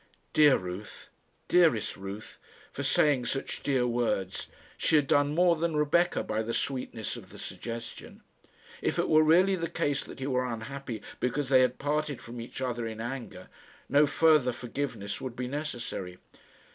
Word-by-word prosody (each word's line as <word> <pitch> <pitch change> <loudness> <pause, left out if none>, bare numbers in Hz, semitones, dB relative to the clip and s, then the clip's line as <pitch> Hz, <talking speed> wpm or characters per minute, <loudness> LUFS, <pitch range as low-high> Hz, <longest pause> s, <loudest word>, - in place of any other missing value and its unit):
Dear 150 -3 +6
Ruth! 90 +3 -8 0.4
Dearest 165 - +3
Ruth, 100 +2 -8 0.3
for - - -5
saying 135 -5 +3
such 135 +2 -3
dear 130 -3 +1
words! 115 -6 -1 0.3
She 160 - +2
had 150 -2 +5
done 145 +2 +2
more 175 0 +5
than 165 0 -1
Rebecca 150 +4 +2
by 110 +1 -1
the 115 +1 -3
sweetness 125 -5 -3
of - - -12
the - - -12
suggestion. 115 0 -7 0.6
If - - 0
it - - +1
were 155 0 +6
really 175 +5 +5
the 165 -2 -3
case 140 -1 0
that - - -10
he 130 - -3
were 130 -2 +1
unhappy 115 0 -6 0.2
because 135 +2 -1
they 130 -2 +6
had 125 0 +2
parted 145 -1 -1
from 120 0 -8
each 120 +3 -8
other 120 -3 -2
in 110 -1 -6
anger, 115 -6 -6 0.4
no 145 +2 +5
further 145 -3 +4
forgiveness 120 -4 -4
would 130 -3 -5
be 125 0 -3
necessary. 120 -10 -4
130 Hz, 165 wpm, -29 LUFS, 115-150 Hz, 0.6 s, Dear